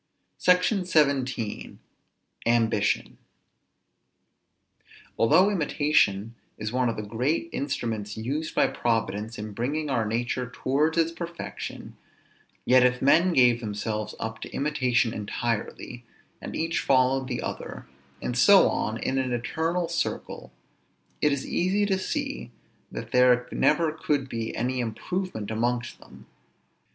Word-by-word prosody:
SECTION 180 +2 +3
XVII. 135 - 0 0.7
AMBITION. 115 -3 +1 2.0
Although 180 - +5
imitation 145 - +1 0.2
is 110 - -4
one 125 -1 +2
of 115 - -2
the 105 - -4
great 125 +11 -1
instruments 115 -7 -3
used 140 +8 -3
by - - +4
Providence 110 -1 -1
in 105 0 -6
bringing 140 +8 -2
our 120 -4 +1
nature 120 +3 -2
towards 150 +6 0
its 165 0 +3
perfection, 170 0 -7 0.7
yet 130 0 +6
if 125 0 +3
men 170 +7 +4
gave 125 -4 +5
themselves 105 -1 -4
up 110 0 -4
to - - -6
imitation 130 -5 +1
entirely, 115 +3 -4 0.4
and - - -6
each 165 +1 -1
followed 130 0 +2
the 125 -2 -3
other, - - -6 0.4
and 125 - -2
so 195 +11 +7
on 110 +1 -2
in 135 +3 -1
an 130 -1 -1
eternal 165 +8 -1
circle, 170 0 -3 0.7
it 150 - +4
is 140 -1 -2
easy 195 +4 +1
to 190 -2 0
see - - -3 0.4
that - - -7
there 125 -1 +4
never 155 +1 +2
could 145 -3 -1
be 115 -3 -4
any 125 +2 -1
improvement 120 - -3
amongst 120 +2 -1
them. - - -16
125 Hz, 125 wpm, -26 LUFS, 115-155 Hz, 2.0 s, so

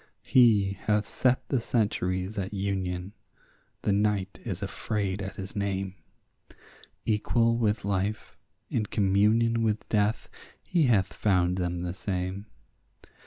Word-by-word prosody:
He 105 -6 +4
hath 105 -1 +2
set 125 +3 +1
the 130 -4 +1
centuries 95 -4 -1
at 95 +2 -4
union; 95 -1 -2 0.7
the - - +2
night 100 -2 0
is - - -4
afraid 100 -2 -2
at 100 -1 -5
his 95 0 -7
name; 95 -2 -2 1.1
Equal 115 +2 +2
with 110 -3 0
life, 100 +1 -2 0.4
in 110 -3 0
communion 105 +4 +3
with 110 -1 0
death, 105 0 +1 0.4
he 165 -6 +2
hath 100 -6 +2
found 90 -3 +2
them 90 -1 -2
the 90 0 -3
same. 95 +1 -3
100 Hz, 120 wpm, -28 LUFS, 95-110 Hz, 1.1 s, He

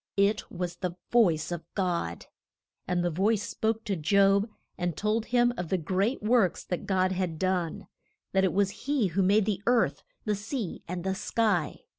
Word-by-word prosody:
It 200 +2 +2
was 175 -1 -4
the 180 -2 -3 0.2
voice 175 -10 +3
of 170 -1 -4
God. 175 - -1 0.6
And 180 -1 0
the 175 - +1
voice 205 +5 +1
spoke 225 0 -1
to 205 -4 -1
Job 200 +5 +3 0.3
and 175 -3 -2
told 215 +2 0
him 240 0 +3
of 175 -2 -4
the 190 - +2
great 195 - -1
works 215 -5 +2
that 180 - -4
God 185 -1 +2
had 180 -3 -2
done; 180 -2 -1 0.5
that 190 0 +2
it 190 - +3
was 200 0 +2 0.2
he 275 -9 +2
who 185 +4 0
made 200 +2 +4
the 200 -2 -1
earth, 230 - +2 0.2
the 210 - +1
sea, 210 0 -4
and 175 0 -4
the 190 0 0
sky. 195 -5 0
190 Hz, 180 wpm, -28 LUFS, 175-215 Hz, 0.6 s, made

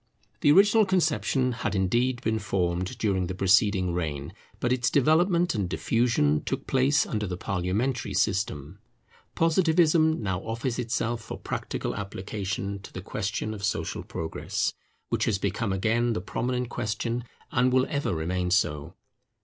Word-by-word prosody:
The 145 - +5
original 205 +6 +6
conception 155 -8 +1
had 110 -4 -3
indeed 120 +7 +1
been 110 0 0
formed 90 -2 -1
during 95 -4 0
the 95 - -4
preceding 95 -1 +3
reign; 75 -2 -3 0.3
but 125 - +1
its 125 -2 +1
development 170 +5 +3
and 100 -5 -1
diffusion 80 -4 +1
took - - -3
place 135 +3 +3
under 105 -2 -2
the 90 -1 -4
parliamentary 100 +6 -1
system. 95 -4 -1 0.6
Positivism 160 -3 +3
now 95 -3 -1
offers 115 +4 -3
itself 115 0 -1
for 110 - -7
practical - - -4
application 100 0 -4
to 100 - -12
the 95 - -7
question 105 +2 -3
of 100 -2 -8
social 100 - -1
progress, 80 -1 -3 0.4
which - - +1
has 105 - +1
become 100 +2 -1
again 115 +5 +1
the 110 - -1
prominent 125 +5 -2
question, 120 +1 -2 0.3
and 125 0 +3
will 130 0 +3
ever 145 -1 -1
remain 90 +3 -1
so. 80 -3 0
110 Hz, 145 wpm, -27 LUFS, 95-125 Hz, 0.6 s, original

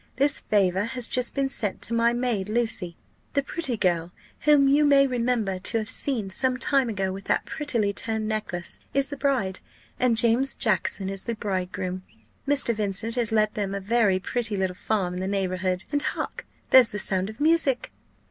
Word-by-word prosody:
This 280 +2 +2
favour 190 -1 +1
has 250 0 -1
just 250 -1 0
been 275 -1 +1
sent 215 -7 -2
to 235 - +1
my 230 0 +3
maid. 240 -5 -2
Lucy, 215 -7 0 0.4
the 280 - +2
pretty 275 -5 -3
girl 175 -3 0 0.3
whom 295 -2 +4
you 285 +2 +4
may 280 -1 +5
remember 235 -6 -1
to 225 +4 -1
have 220 +2 -3
seen 225 -9 -2
some 255 +5 0
time 270 -2 +2
ago 195 -3 -2
with 195 +1 -8
that - - 0
prettily 235 -10 -1
turned 220 0 -2
necklace, 210 -5 -4 0.2
is 275 0 +1
the 285 - -5
bride, 260 -9 -1 0.4
and 245 -3 +2
James 240 +4 +6
Jackson 195 -3 0
is 195 0 -4
the 235 - -3
bridegroom. 185 -2 -4 0.5
Mr. 280 -4 +3
Vincent 210 +2 -1
has 235 -2 +3
let 215 -1 +2
them 200 -2 -3
a - - -3
very 205 -1 +2
pretty 220 +2 -2
little 190 -1 -1
farm 185 -1 -2
in 180 - -5
the 190 - -3
neighbourhood, 185 -1 -2
and 290 -1 +1
hark! - - -4 0.2
there's 255 -3 +7
the 205 - -5
sound 190 -1 -1
of 220 - -11
music." 300 -4 +2
220 Hz, 185 wpm, -25 LUFS, 190-255 Hz, 0.5 s, there's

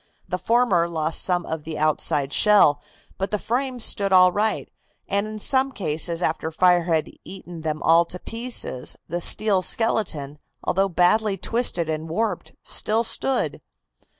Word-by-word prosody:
The 180 - -3
former 225 -8 +2
lost 160 -1 -1
some 180 -2 0
of 160 -1 -5
the 155 0 -6
outside 150 -2 0
shell, 200 -9 +4 0.4
but 195 +1 -2
the 210 - -1
frame 250 +4 -3
stood 200 -3 0
all 185 -1 +6
right, 215 +4 -1 0.4
and 200 +1 -1
in 215 0 -7
some 265 +5 +3
cases 165 - -2
after 160 0 -1
fire 175 +1 +3
had 160 -3 -1
eaten 175 -3 -10
them 155 -1 -4
all 165 +1 +4
to 180 - -7
pieces, 225 - -2
the 175 +2 -3
steel 205 +1 +3
skeleton, 165 -10 -2 0.2
although 195 +2 0
badly 195 +4 +2
twisted 225 -9 0
and 160 0 -4
warped, 220 +8 -3
still 220 +2 +1
stood. 265 +3 -1
180 Hz, 150 wpm, -23 LUFS, 160-215 Hz, 0.4 s, all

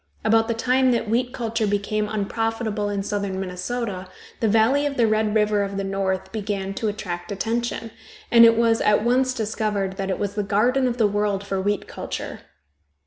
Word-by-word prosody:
About 225 0 +4
the 230 - -1
time 255 +3 +2
that 235 -1 -1
wheat 245 +3 0
culture 230 -3 -1
became 205 +1 -1
unprofitable 220 0 -2
in 200 -1 -2
southern 200 -2 -2
Minnesota, 190 +1 -4 0.3
the 230 - +1
valley 225 +7 +3
of 280 - -4
the 235 - +4
Red 215 0 +1
River 210 -1 +3
of 200 0 -3
the 195 - -1
North 195 -1 -2
began 200 -2 -3
to 220 - -2
attract 185 -3 -4
attention, 230 +2 -2 0.4
and 235 -1 +8
it 230 -1 +7
was 230 -1 +3
at 210 0 +3
once 255 +2 +2
discovered 210 -4 -2
that 195 0 -3
it 190 - -1
was 200 -1 -2
the 210 - -1
garden 240 +7 +2
of 245 -1 -2
the 225 - +3
world 205 -1 0
for 195 -1 -2
wheat 205 +1 -1
culture. - - -6
215 Hz, 190 wpm, -23 LUFS, 200-230 Hz, 0.4 s, and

